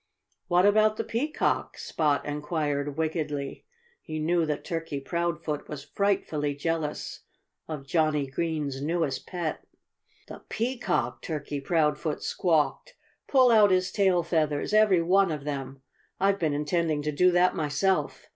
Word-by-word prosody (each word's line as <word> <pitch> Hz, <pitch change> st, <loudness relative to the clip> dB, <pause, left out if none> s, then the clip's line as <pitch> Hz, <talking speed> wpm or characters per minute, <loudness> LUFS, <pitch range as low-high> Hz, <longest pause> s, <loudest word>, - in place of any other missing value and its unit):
"What 180 Hz, +1 st, +4 dB
about 215 Hz, +1 st, +4 dB
the -, -, -1 dB
Peacock?" 295 Hz, +8 st, -1 dB
Spot 150 Hz, -3 st, 0 dB
inquired 145 Hz, -1 st, -2 dB
wickedly. 150 Hz, -3 st, -3 dB, 0.3 s
He 155 Hz, -1 st, -6 dB
knew 165 Hz, +1 st, +1 dB
that 150 Hz, -1 st, -2 dB
Turkey 165 Hz, -5 st, -3 dB
Proudfoot 170 Hz, 0 st, -3 dB
was 145 Hz, -2 st, -6 dB
frightfully 150 Hz, -6 st, -1 dB
jealous 155 Hz, 0 st, -3 dB, 0.5 s
of 150 Hz, -4 st, -6 dB
Johnnie 155 Hz, -1 st, +1 dB
Green's 145 Hz, -1 st, -3 dB
newest 155 Hz, -2 st, -1 dB
pet. 175 Hz, -4 st, -3 dB, 0.6 s
"The -, -, -9 dB
Peacock!" 235 Hz, -4 st, -1 dB
Turkey 145 Hz, -3 st, -4 dB
Proudfoot 150 Hz, 0 st, 0 dB
squawked. 175 Hz, -, 0 dB, 0.3 s
"Pull 255 Hz, -3 st, +5 dB
out 215 Hz, -3 st, +6 dB
his 185 Hz, 0 st, +2 dB
tail 190 Hz, -4 st, +2 dB
feathers 155 Hz, 0 st, 0 dB
every 210 Hz, -5 st, +5 dB
one 190 Hz, +2 st, +4 dB
of 150 Hz, -2 st, -4 dB
them! 135 Hz, -2 st, -5 dB, 0.4 s
I've 195 Hz, +1 st, +2 dB
been 155 Hz, -4 st, 0 dB
intending 150 Hz, 0 st, 0 dB
to 150 Hz, -, -1 dB
do 180 Hz, +5 st, +4 dB
that 180 Hz, +1 st, +3 dB
myself. 155 Hz, +5 st, 0 dB
160 Hz, 135 wpm, -27 LUFS, 145-180 Hz, 0.6 s, out